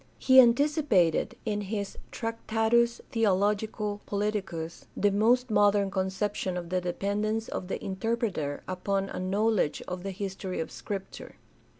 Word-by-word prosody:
He 260 0 +6
anticipated, 245 - +3
in 210 -2 -1
his 200 0 -4
Tractatus 230 +1 +1
theologico 210 0 0
politicus, 195 -5 -3
the 205 - +3
most 235 +4 +3
modern 205 -1 +3
conception 190 0 -1
of 170 -1 -5
the 185 0 0
depend 200 +4 -2
ence 220 +1 -1
of 180 - -5
the - - -3
interpreter 190 -7 -2
upon 195 +1 -1
a - - -4
knowledge 195 -2 +1
of 180 0 -4
the 195 - -4
history 190 -1 -4
of 160 - -3
Scripture. 195 -2 -7
205 Hz, 130 wpm, -28 LUFS, 190-225 Hz, -, He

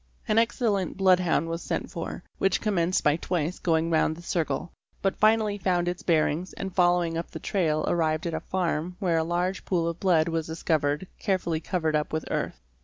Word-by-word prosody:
An 220 0 +4
excellent 225 -6 0
bloodhound 185 -4 +3
was 165 +1 -3
sent - - -3
for, - - -5 0.2
which 195 -1 +2
commenced 185 -4 +1
by 150 +1 +3
twice 175 -1 -2
going 165 -1 +1
round 160 -1 +2
the 170 - -11
circle, 165 -1 -2 0.3
but 195 - +1
finally 215 -1 +3
found 175 -2 +1
its 175 0 -2
bearings 165 +1 +1
and 190 -1 -5
following 175 -2 +2
up 170 - -6
the 160 - -7
trail 160 -5 0
arrived 160 -2 +1
at 170 - -2
a 160 - -1
farm 175 -1 -2
where 175 -5 +1
a - - +1
large 175 +3 -1
pool 170 -3 0
of 170 0 -3
blood 170 -4 +3
was 165 -1 -1
discovered 160 -1 0
carefully 185 -5 0
covered 160 -2 -1
up 150 0 0
with 155 - -1
earth. - - -2
175 Hz, 190 wpm, -27 LUFS, 160-185 Hz, 0.3 s, An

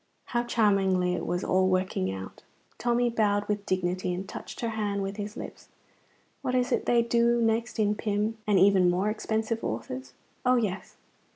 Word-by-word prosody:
(How 240 - 0
charmingly 195 -6 +2
it - - -3
was 175 +2 -1
all 185 0 +2
working 185 - 0
out!) 95 0 -8 0.4
Tommy 240 0 +2
bowed 205 -2 +1
with 205 -1 -2
dignity 185 0 0
and 190 +2 -5
touched - - -8
her 230 - -1
hand 205 -2 -2
with 195 +1 -4
his 210 0 -5
lips. - - -8 0.7
What 255 -2 -1
is 250 0 +1
it - - 0
they 235 -1 +4
do 235 0 +3
next 230 +1 0
in 210 -1 +2
Pym 210 +1 -1
and 205 -2 +4
even 190 -1 +5
more 190 +4 +1
expensive 220 +1 -2
authors? 125 +3 -5 0.3
Oh, 250 0 +4
yes! 210 -6 -2
205 Hz, 175 wpm, -28 LUFS, 185-230 Hz, 0.7 s, even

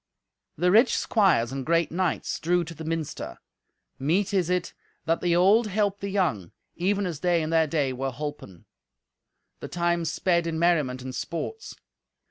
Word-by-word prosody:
The 180 +3 +2
rich 225 +6 +5
squires 170 - +2
and 135 0 -4
great 165 +3 +1
knights 180 0 -1
drew 175 +2 +1
to 165 0 -8
the 160 0 -9
minster. 160 -1 -4 0.6
Meet 180 +9 +1
is 180 -3 +1
it 180 -1 -1 0.3
that 165 0 +1
the 175 -1 +2
old 200 +6 +4
help 205 0 0
the 200 - -4
young, 160 - -1 0.2
even 200 +3 0
as 170 -5 -4
they 175 -1 +1
in 155 - -3
their 160 -1 +3
day 145 -4 0
were 135 +2 -2
holpen. 135 - -7 0.9
The - - -6
time 170 -1 0
sped 170 0 +1
in 165 -1 -2
merriment 150 -7 +1
and 130 0 -6
sports. 430 - -5
170 Hz, 165 wpm, -26 LUFS, 150-185 Hz, 0.9 s, rich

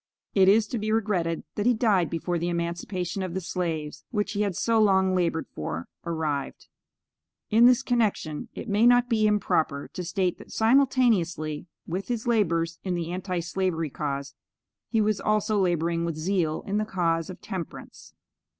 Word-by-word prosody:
It 190 -1 +5
is 215 +2 +5
to 240 - -2
be 215 +1 -2
regretted 195 -7 0
that 210 +2 -1
he 245 - +4
died 210 - +2
before 170 +1 -2
the 170 +1 -1
emancipation 170 +2 -3
of 185 -2 -4
the - - 0
slaves, 165 -4 -3
which 210 -3 -1
he 205 0 -1
had 200 -4 0
so 225 +3 +2
long 190 -2 +4
labored 170 -3 0
for, 80 +2 -4 0.2
arrived. 155 -5 -3 0.9
In 230 +3 +7
this 250 +1 +4
connection 215 - 0
it - - -6
may 215 +3 +4
not 245 0 +5
be 215 -3 +3
improper 160 -8 0
to 180 - -4
state 180 +1 -1
that - - -13
simultaneously 220 - +2 0.2
with 185 +3 -4
his 235 -2 -2
labors 170 -8 +1
in 185 -2 -1
the 170 -1 -3
Anti 180 -1 -2
slavery 165 -3 -1
cause, 140 -1 -4 0.6
he 225 -2 +2
was 210 -2 +1
also 215 0 +1
laboring 170 -2 +1
with 170 -2 -2
zeal 160 -1 -1
in 205 +1 0
the 215 - 0
cause 165 -5 0
of 185 - -8
Temperance. 185 -6 -8
185 Hz, 170 wpm, -26 LUFS, 165-215 Hz, 0.9 s, In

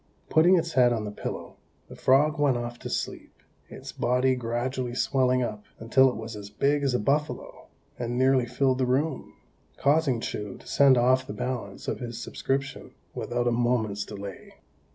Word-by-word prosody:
Putting 170 +4 +6
its 165 0 -2
head 125 -2 +5
on 110 -3 -1
the 105 - -5
pillow, - - -6 0.3
the - - -11
frog 150 +4 +3
went 140 -4 +3
off 120 0 -5
to - - -7
sleep, - - -4 0.3
its - - -9
body 125 +1 +1
gradually 125 +1 -3
swelling 130 -1 +2
up 105 -3 -5
until 130 +4 +4
it 125 - -5
was 110 0 -7
as 100 -1 -8
big 140 +8 +1
as 135 -3 +1
a - - +1
buffalo, 145 +7 -2 0.3
and 120 0 -2
nearly 130 -1 +3
filled 130 +1 +1
the 130 - +1
room, 135 +3 -1 0.4
causing 140 -4 +2
Chou 105 -3 -5
to - - -18
send 135 -2 +5
off 130 +2 +3
the - - -5
balance 110 -3 -5
of - - -2
his 120 -2 -6
subscription 135 +3 -4 0.2
without 120 0 -2
a - - +3
moment's 115 -4 0
delay. 100 -1 -9
125 Hz, 175 wpm, -27 LUFS, 115-135 Hz, 0.4 s, Putting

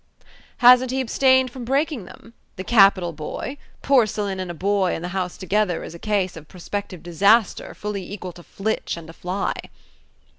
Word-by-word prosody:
"Hasn't 250 +1 +7
he 260 +1 -1
abstained 260 0 +3
from 255 0 -8
breaking 275 - -1
them? 230 +5 -15 0.2
the 185 - -6
capital 195 -5 +4
boy! 160 - -6 0.3
Porcelain 215 -7 +1
and 185 -1 -4
a 175 - -5
boy 195 +1 +1
in 165 - -6
the 180 - -4
house 185 -2 -3
together 195 -2 0
is - - -8
a 170 - -10
case 200 -3 -1
of 160 -2 -11
prospective 185 +1 -6
disaster 200 +6 +2
fully 200 -3 -5
equal 185 -3 -6
to 175 - -13
Flitch 200 +1 -3
and 165 -1 -10
a - - -16
fly." 185 +4 -2
200 Hz, 175 wpm, -22 LUFS, 180-235 Hz, 0.3 s, Hasn't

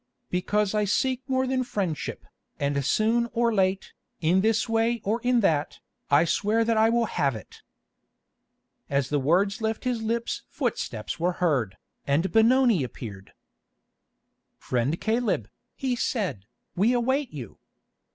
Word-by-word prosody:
"Because 205 +3 0
I 210 0 +2
seek 255 +5 0
more 260 0 +1
than 260 0 0
friendship, 190 -10 -3 0.3
and 140 0 0
soon 225 - +2
or 235 -1 +2
late, 190 -1 0 0.3
in 175 +4 +3
this 225 +3 +2
way 225 +1 +1
or 220 +4 -1
in 245 0 +2
that, 155 -6 +1 0.3
I 145 +3 +5
swear 215 +6 +1
that 230 0 +2
I 220 +1 +4
will 235 0 +2
have 140 - 0
it." 110 - -11 1.3
As 140 -2 0
the 145 - +1
words 185 +10 +1
left 220 0 -2
his 245 -3 -1
lips 230 +1 -2
footsteps - - -3
were 175 +2 +1
heard, 135 - 0 0.3
and 155 +7 +1
Benoni 230 - +4
appeared. 105 -5 -8 1.2
"Friend 130 +6 -1
Caleb," 220 - 0 0.3
he 260 -2 -1
said, 195 - -2 0.3
"we 215 +7 +3
await 260 +3 0
you. 125 -8 -9
210 Hz, 140 wpm, -26 LUFS, 155-235 Hz, 1.3 s, I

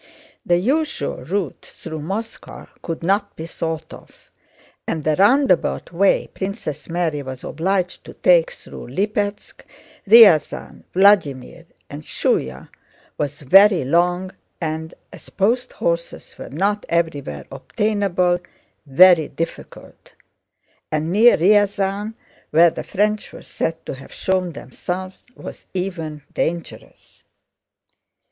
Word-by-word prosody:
The 175 - +2
usual 290 - -1
route 170 +4 -4
through 160 -2 -8
Moscow 200 +9 -6 0.2
could 165 -1 -5
not 200 +3 0
be 160 - -7
thought 160 -1 -5
of, - - -16 0.6
and 160 -2 -2
the 155 0 +1
roundabout 205 - +2
way 195 +3 +2
Princess 185 -7 -5
Mary 165 -3 -1
was 130 -2 -8
obliged 180 +3 -2
to - - -11
take - - +4
through - - -11
Lípetsk, 205 +1 -3 0.5
Ryazán, 200 -8 +5
Vladímir, 170 -5 +2 0.2
and 145 +1 -8
Shúya 65 - -2 0.5
was 145 0 -3
very 190 +3 +5
long 175 +5 +1 0.3
and, 160 -1 -4 0.2
as - - -12
post 230 +6 0
horses 170 0 -3
were - - -9
not 200 +7 -1
everywhere 145 - -2
obtainable, 195 -4 0 0.5
very 165 +3 +6
difficult, 165 - -8 0.8
and 155 +2 -1
near 225 +5 +6
Ryazán 205 +2 +1 0.3
where 165 +2 +5
the - - -6
French 210 +1 -1
were - - -12
said 165 0 -4
to - - -5
have 135 0 -12
shown 185 -2 -1
themselves 180 +8 -7
was - - -10
even 165 -5 -4
dangerous. 170 0 -5
175 Hz, 115 wpm, -20 LUFS, 160-200 Hz, 0.8 s, very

